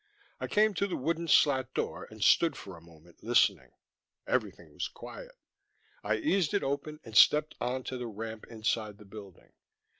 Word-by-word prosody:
I - - -3
came 215 0 +3
to 200 +2 0
the 185 - -3
wooden 165 +4 -2
slat 130 -4 +3
door - - -3
and 110 -1 -6
stood 165 -4 +4
for 95 - -9
a 85 - -14
moment, 85 0 -19
listening; 115 +1 +2 0.6
everything - - -2
was - - -3
quiet. - - -11 0.7
I - - +1
eased 200 - +1
it 200 - +1
open 145 +2 -3
and 110 -2 -11
stepped 150 +5 +6
on 125 +2 -2
to 130 0 -5
the 120 - -4
ramp 110 0 -7
inside 110 -2 -2
the 105 - -15
building. 100 -2 -13
125 Hz, 175 wpm, -30 LUFS, 110-160 Hz, 0.7 s, stepped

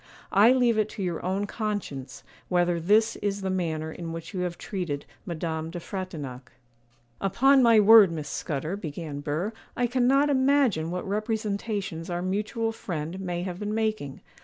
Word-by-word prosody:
I 210 +5 +6
leave 245 -4 +3
it 215 0 +1
to 200 - -2
your 175 -3 -3
own 190 +3 -1
conscience 205 - -4 0.3
whether 175 -1 +2
this 210 +6 +3
is 200 -1 -2
the 190 -1 -1
manner 160 -4 -2
in 165 0 -6
which 165 +4 -7
you 185 - -3
have 180 -1 -2
treated 175 -8 -4 0.2
Madame 160 -1 -3
de 175 +1 -6
Frontignac.' 155 -10 -6 0.7
'Upon 265 +8 +4
my 230 -3 +6
word, 210 -3 +8
Miss 155 -3 -5
Scudder,' 155 +4 -3
began 155 -5 -6
Burr, 155 +9 -2 0.2
'I 245 - +2
cannot 260 +4 +3
imagine 260 - +3
what 180 +2 -4
representations 205 -4 -2
our 175 0 -2
mutual 215 +4 -1
friend 170 -4 -5
may 175 -2 -3
have 180 -1 -5
been 210 +1 -2
making. 215 -11 -2
190 Hz, 160 wpm, -27 LUFS, 165-215 Hz, 0.7 s, word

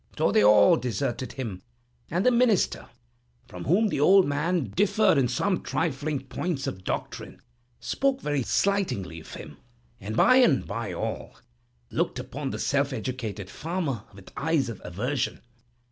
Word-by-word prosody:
So 100 - +2
they 105 - +4
all 105 0 +6
deserted 125 +1 -3
him, 110 -9 -5 0.5
and 175 +4 0
the 250 - +6
minister, 235 -4 +2 0.6
from 90 -6 -8
whom 205 +8 +3
the - - -2
old 190 +5 +6
man 150 - -1
differed 205 -4 +3
in 130 - +2
some 180 +10 0
trifling 140 +1 -2
points 135 +3 -3
of 95 -1 -5
doctrine, - - -5 0.4
spoke 270 -1 0
very 145 - -1
slightingly 120 - 0
of 80 - -11
him; - - -10 0.4
and 110 +3 -5
by 255 - +6
and 205 - +4
by - - -4
all - - -5 0.6
looked - - -1
upon 140 +1 -5
the - - -4
self 140 0 0
educated 110 -5 -4
farmer 155 - -3
with 100 -1 -14
eyes 150 -4 0
of 115 - -8
aversion. 115 +10 -2
140 Hz, 150 wpm, -26 LUFS, 115-180 Hz, 0.6 s, all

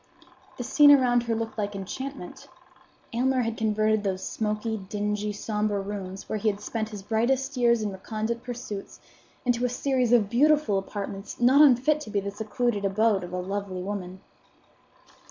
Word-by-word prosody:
The 245 - -4
scene 290 +4 +6
around 250 -4 +5
her 230 -1 0
looked 225 0 -4
like 205 -1 -2
enchantment. 230 +2 -7 0.7
Aylmer 255 +2 +2
had 230 -1 -2
converted 215 -1 +1
those 190 -2 -2
smoky, 220 +1 -2
dingy, 210 +1 -2
sombre 210 0 -1
rooms, 195 -1 -6
where 215 - -2
he 215 +1 +2
had 200 -1 -3
spent 220 +1 -3
his 205 -3 -8
brightest 255 +6 0
years 235 -2 +3
in 205 - -2
recondite 220 +4 -4
pursuits, 235 -5 -7 0.5
into 245 0 +1
a 250 - +2
series 255 -1 0
of 230 -4 +5
beautiful 255 -3 +3
apartments 195 0 -6
not 255 +4 +6
unfit 295 +2 +5
to 225 - -8
be 205 -1 0
the 200 0 -4
secluded 215 +1 -2
abode 200 0 +2
of 175 - -7
a 180 - -3
lovely 190 0 -4
woman. 190 -2 -5
215 Hz, 165 wpm, -26 LUFS, 200-245 Hz, 0.7 s, scene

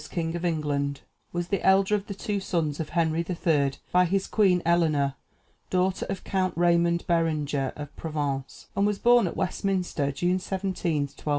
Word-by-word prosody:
King 165 -1 -2
of 170 - -4
England, 145 -4 -1 0.3
was 175 0 -3
the 200 - -1
elder 190 +1 +4
of 205 -1 0
the 200 - -5
two 205 0 -2
sons 165 -6 -1
of 160 - -3
Henry 160 -1 +2
III., 150 -6 +1 0.2
by 180 0 +5
his 195 +2 0
queen, 190 -5 +3
Eleanor, 155 -5 +2 0.6
daughter 185 +1 0
of 195 -1 -4
Count 185 -2 -1
Raymond 170 0 +3
Berenger 150 -5 0
of 145 -1 -8
Provence, 145 -4 -4
and 200 +1 +3
was 210 -1 0
born 240 -3 +5
at - - -5
Westminster, 180 -6 -1
June 175 +6 0
17, 185 -5 -1
1239. 140 +2 -7
170 Hz, 170 wpm, -26 LUFS, 150-190 Hz, 0.6 s, by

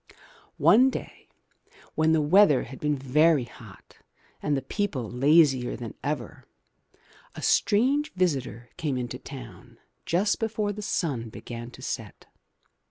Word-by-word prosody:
One 215 - +6
day - - -8 0.7
when 160 0 +2
the 160 -1 +3
weather 160 -3 +5
had 130 +2 -10
been 150 0 0
very 145 +2 +3
hot 115 -4 -15 0.4
and 145 -2 0
the 135 - -4
people 140 - -2
lazier 135 0 +3
than 115 -3 -7
ever, 140 -6 -4 0.9
a - - -8
strange 275 +8 +2
visitor 135 - -2
came 150 -6 -2
into 125 0 -4
town 125 -9 -11 0.3
just 195 +5 +1
before 215 -2 -1
the 210 - -7
sun 135 - -2
began 120 +1 -8
to - - -13
set. - - -6
145 Hz, 130 wpm, -26 LUFS, 125-185 Hz, 0.9 s, One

